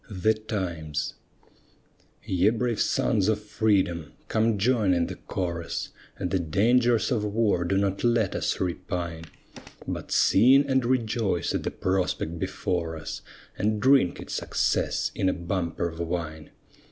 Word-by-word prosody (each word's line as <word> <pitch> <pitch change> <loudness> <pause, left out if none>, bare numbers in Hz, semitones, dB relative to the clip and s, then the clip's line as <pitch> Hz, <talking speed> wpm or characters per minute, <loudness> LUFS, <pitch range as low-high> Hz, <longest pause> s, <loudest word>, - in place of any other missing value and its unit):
THE 105 +2 +2
TIMES 90 -9 -3 1.1
Ye 95 +2 +3
brave 115 0 -1
sons 105 -5 +1
of 110 -1 +2
Freedom, 95 -7 0 0.2
come 110 0 +2
join 105 -3 +2
in 85 -1 +1
the - - -5
chorus, 85 -2 -4 0.3
At 90 - -2
the 95 - +2
dangers 115 - +2
of 115 -4 +1
war 105 -3 +1
do 95 +3 +1
not 100 -1 0
let 115 -4 +2
us - - -1
repine, 85 -2 -3 0.6
But - - -5
sing 130 +7 +5
and 130 -1 +2
rejoice 115 -7 0
at - - -1
the - - -2
prospect 90 -3 -1
before 85 -2 -2
us, 80 - -6 0.4
And 105 +1 +1
drink 130 -8 +4
it - - -8
success - - 0
in 95 - +1
a - - +1
bumper 85 -1 -2
of 80 0 -11
wine. 80 -2 -4
95 Hz, 140 wpm, -26 LUFS, 85-110 Hz, 1.1 s, sing